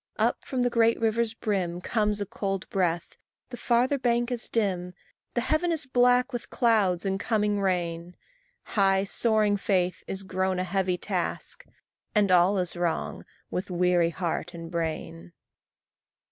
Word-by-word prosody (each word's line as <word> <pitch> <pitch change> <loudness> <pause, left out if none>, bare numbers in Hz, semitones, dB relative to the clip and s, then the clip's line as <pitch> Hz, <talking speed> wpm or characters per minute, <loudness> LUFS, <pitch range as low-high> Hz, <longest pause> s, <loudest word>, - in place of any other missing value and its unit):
Up - - +1
from 255 -2 -1
the 245 - +1
great 230 -1 +3
river's 225 0 +1
brim 185 -6 -2
Comes 210 +1 0
a 205 - -2
cold 195 -2 -3
breath; 175 -3 -1 0.3
the - - -4
farther 245 +3 +1
bank 240 0 +1
is 240 -1 -3
dim; 180 -5 -1 0.4
The 240 - +2
heaven 310 +7 +1
is 315 -3 0
black 250 +1 +3
with 240 - -5
clouds 205 -7 +2
and 195 0 0
coming 210 -2 0
rain; 175 -2 -2 0.5
High 195 -2 +2
soaring 210 0 +2
faith 185 -2 0
is 195 0 -4
grown 185 0 -1
a 180 - 0
heavy 185 0 0
task, - - -3 0.5
And 205 -2 +3
all 180 +3 +5
is 180 -2 -1
wrong 175 -2 -2 0.3
with 180 - -3
weary 180 -1 +2
heart 175 0 -3
and 165 0 -8
brain. 160 - -4
195 Hz, 150 wpm, -27 LUFS, 180-230 Hz, 0.5 s, all